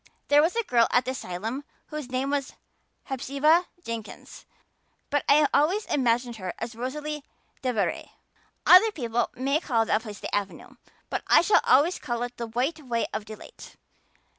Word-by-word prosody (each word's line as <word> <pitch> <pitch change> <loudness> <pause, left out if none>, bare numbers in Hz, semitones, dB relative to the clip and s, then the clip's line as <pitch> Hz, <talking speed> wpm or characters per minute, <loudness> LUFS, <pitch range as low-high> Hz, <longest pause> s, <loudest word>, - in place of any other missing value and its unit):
There 290 0 +6
was 330 +6 +1
a 465 - +1
girl 235 - +3
at 245 -1 +2
the 260 - -1
asylum 225 +3 -5 0.3
whose 300 -4 -6
name 260 +2 -1
was 285 -1 -2 0.5
Hepzibah 280 +6 +1 0.2
Jenkins, 230 -4 -8 0.6
but 290 0 +1
I 295 +1 +6
always 370 +9 +2
imagined 240 -2 0
her 185 -3 -5
as 230 +1 -5
Rosalia 295 +5 -4 0.4
DeVere. 245 -6 -1 0.6
Other 415 +5 +8
people 240 - -1
may 275 +4 0
call 230 -8 +1
that 215 - +1
place 210 -3 -9
the - - -7
Avenue, 200 -1 -4 0.3
but - - -1
I - - +6
shall 420 - +4
always 310 +7 +4
call 240 -1 -3
it 245 0 -6
the 235 - -4
White 255 +8 -1
Way 235 -3 -1
of 215 -1 -4
Delight. 215 0 -12
255 Hz, 165 wpm, -26 LUFS, 230-295 Hz, 0.6 s, Other